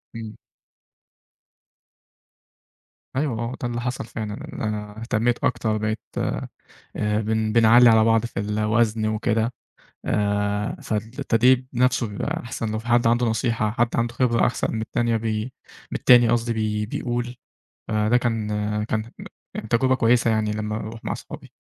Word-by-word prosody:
امم. 110 -1 -7 2.8
أيوه، 130 -5 -1
هو 120 +2 -3
ده 120 - -1
اللي 120 0 -3
حصل 125 -1 -3
فعلًا، 110 -3 -5 0.2
إن - - -6
أنا 105 -1 -4
اهتميت 115 0 0
أكتر 110 -3 +1
بقيت 110 +1 -2 0.2
آآ - - -2 0.7
بن 110 0 0
بِنعَلِّي 115 +2 +7
على 110 -1 +5
بعض 115 0 +3
في 115 - -4
الوزن 110 +1 +1
وكده، 110 +2 0 0.5
آآ 105 0 0
فالتدريب 115 +3 +1
نفسه 125 -1 +2
بيبقى 100 - -3
أحسن 115 -1 -4
لو 110 - -1
في 115 - -9
حد 120 -1 +3
عنده 120 +1 +3
نصيحة، 110 -1 0
حد 120 +1 +1
عنده 120 0 0
خبرة 115 -1 +2
أحسن 120 - -1
من 110 - -2
التانية 120 0 0
بي 110 -1 -1 0.5
من - - -2
التاني 120 -2 +6
قصدي 120 0 +1
بي 105 -1 -1
بيقول، 120 +1 -3 0.5
فده 110 +3 +2
كان 115 -3 -1 0.4
كان 110 +1 -3 0.6
تجربة 130 +2 +3
كويّسة 115 -1 +3
يعني 110 -1 +1
لمّا 105 0 -3
أروح 110 +1 -6
مع - - -2
صحابي. - - -10
115 Hz, 145 wpm, -23 LUFS, 110-120 Hz, 2.8 s, بِنعَلِّي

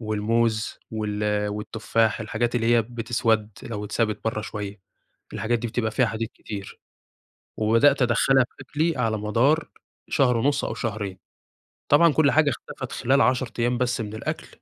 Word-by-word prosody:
والموز 110 +1 0
وال 105 -1 -1
والتفاح 110 +1 0
الحاجات 115 +2 -1
اللي 115 -1 +1
هي 115 - +4
بتِِسوَد 115 -2 0
لو 105 -2 -5
اتسابت 110 0 -1
برّه، 110 -1 -1
شوية 105 -2 -6 0.5
الحاجات 110 +2 0
دي 120 - -3
بتبقى 110 -1 -1
فيها 125 - +2
حديد 115 0 -3
كتير. 100 -2 -8 0.8
وبدأت 115 +6 +4
أدخّلها 125 +2 +4
في - - -13
أكلي 155 +3 -1
على 110 -3 0
مدار 120 +10 +1 0.4
شهر 125 -5 +3
ونُص 140 +4 +1
أو - - -3
شهرين. 105 -5 -4 0.7
طبعًا 150 +1 +6
كل 150 -3 +4
حاجة 150 -1 +4
اختَفَت - - -6
خلال 135 +3 +2
10 130 -1 +2
أيام 120 +1 +1
بس 125 -1 0
من 105 0 -5
الأكل، - - -4
115 Hz, 150 wpm, -24 LUFS, 105-125 Hz, 0.8 s, طبعًا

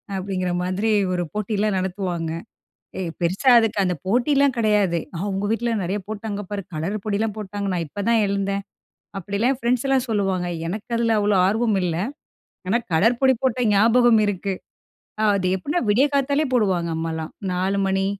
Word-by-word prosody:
அப்படிங்கிற 185 -1 -2
மாதிரி 185 +5 -1 0.2
ஒரு 175 -1 0
போட்டியெல்லாம் 210 -1 0
நடத்துவாங்க. 180 -3 -3 0.7
ஏ, - - -2 0.2
பெருசா 185 +10 +2
அதுக்கு 225 -2 0
அந்த 180 -1 0
போட்டிலாம் 270 +5 +3
கிடையாது 210 -6 +2 0.2
"அவுங்க 195 +1 -2
வீட்ல 235 +1 0
நெறைய 190 +4 -2
போட்டாங்க 210 -1 -4
பாரு, 205 -1 -3
கலர் 165 +7 -2
பொடிலாம் 215 0 -1
போட்டாங்க, 205 -1 -4
நான் 170 -2 -1
இப்பதான் 215 +8 +1
எழுந்தேன்" 200 0 -1 0.5
அப்படிலாம் 200 +7 0
என் 255 - -10
ஃப்ரெண்ட்ஸ்லாம் 255 +2 +1
சொல்லுவாங்க. 195 -4 0 0.2
எனக்கு 215 +7 -5
அதில 230 -1 +2
அவ்வளோ 205 0 +2
ஆர்வம் 220 +1 +1
இல்ல. 170 -2 -1 0.7
ஏன்னா 225 +6 +2
கலர் 225 +9 +3
பொடி 265 -1 +5
போட்ட 255 -1 +1
ஞாபகம் 230 +2 +5
இருக்கு. 200 -1 -2 0.8
அது 185 -2 0
எப்படின்னா, 285 - -1
விடிய 235 +7 +4
காத்தாலே 280 +2 +2
போடுவாங்க. 190 -8 +1
அம்மாலாம் 160 -1 -4 0.2
4 185 +2 0
மணி, 195 0 +1
205 Hz, 150 wpm, -22 LUFS, 190-230 Hz, 0.8 s, பொடி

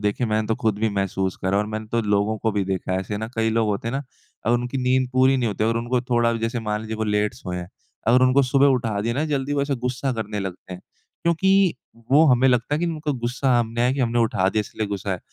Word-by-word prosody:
देखिए 105 +4 0
मैंने 110 0 0
तो 110 - +1
ख़ुद 110 -2 +1
भी 110 0 +1
महसूस 95 -1 -1
करा 95 +2 +1
और 105 - 0
मैंने 110 0 -5
तो 115 - +2
लोगों 105 +1 +1
को 110 - 0
भी 100 -2 0
देखा 95 -1 -2
है 95 - +1
ऐसे 105 +2 -4
ना। 110 0 -4
कई 115 0 +1
लोग 110 0 +1
होते 105 +3 -2
हैं - - -3
ना 140 - -2 0.4
अगर 120 - +4
उनकी 125 +2 -2
नींद 130 0 +1
पूरी 130 +1 +4
नहीं 125 -2 0
होती 105 +1 -1
और 115 +1 +1
उनको 120 +1 0
थोड़ा 120 -1 +1
भी 115 - -2
जैसे 115 +1 -2
मान 105 -1 -2
लीजिए 110 0 -5
वो 110 - -1
लेट 105 +1 0
सोए 90 -7 -6
हैं 90 0 -6 0.4
अगर 125 +2 +5
उनको 130 +2 +5
सुबह 135 +2 +3
उठा 115 -6 +1
दिया 115 +3 -1
ना 150 +4 0
जल्दी 145 -2 -1
वो 140 -1 +1
ऐसे 140 -1 -1
ग़ुस्सा 125 +2 -2
करने 105 -2 -4
लगते 95 -1 -7
हैं। 90 - -8 0.4
क्योंकि 190 +2 +3 0.4
वो 150 +4 +6
हमें 130 -1 +4
लगता 125 +3 +1
है - - 0
कि 175 - 0
उनका 155 -3 -2
ग़ुस्सा 125 +1 0
हमने 115 0 -2
है 125 +1 +3
कि 140 - -2
हमने 120 -1 +1
उठा 95 -5 +2
दिया 110 - +1
इसलिए 105 +1 -4
ग़ुस्सा 100 -1 -4
है। 90 - -1
115 Hz, 270 wpm, -23 LUFS, 105-130 Hz, 0.4 s, वो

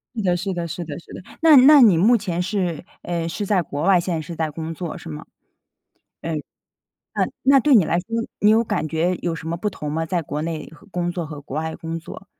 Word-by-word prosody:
是 225 - -2
的 180 -2 +2
是 190 +2 -3
的 170 -1 -3
是 170 +2 -5
的 155 +1 -6
是 - - -15
的。 - - -8 0.2
那 320 -2 +7
那 275 +2 +8
你 205 -8 +6
目 220 +9 +5
前 185 -6 -2
是， 180 -3 -2 0.2
嗯， 170 -1 -3
是 205 +5 -3
在 195 -2 +2
国 145 -1 -5
外， 185 -1 +5
现 175 +1 -2
在 160 - -2
是 165 +2 -8
在 160 -1 -2
工 160 +1 -5
作 170 0 -6
是 - - -10
吗？ 75 - -7 1.0
呃， 165 - -4 0.8
那 - - +1 0.2
那 275 0 +6
对 275 +1 +4
你 200 -7 +5
来 170 +2 +1
说 175 - -10 0.3
你 210 - +4
有 225 +2 +5
感 160 -7 -2
觉 165 +3 0
有 170 -2 -1
什 160 - -8
么 165 - -1
不 210 +5 -2
同 150 -6 -6
吗？ 160 +2 -1
在 170 +1 -1
国 150 0 -4
内 160 -1 -4
和 200 +5 -18
工 175 -2 -2
作 175 -1 -4
和 150 -1 -8
国 140 - -8
外 160 +1 -3
工 165 -1 -5
作。 180 +4 -11
170 Hz, 265 characters per minute, -22 LUFS, 160-195 Hz, 1.0 s, 那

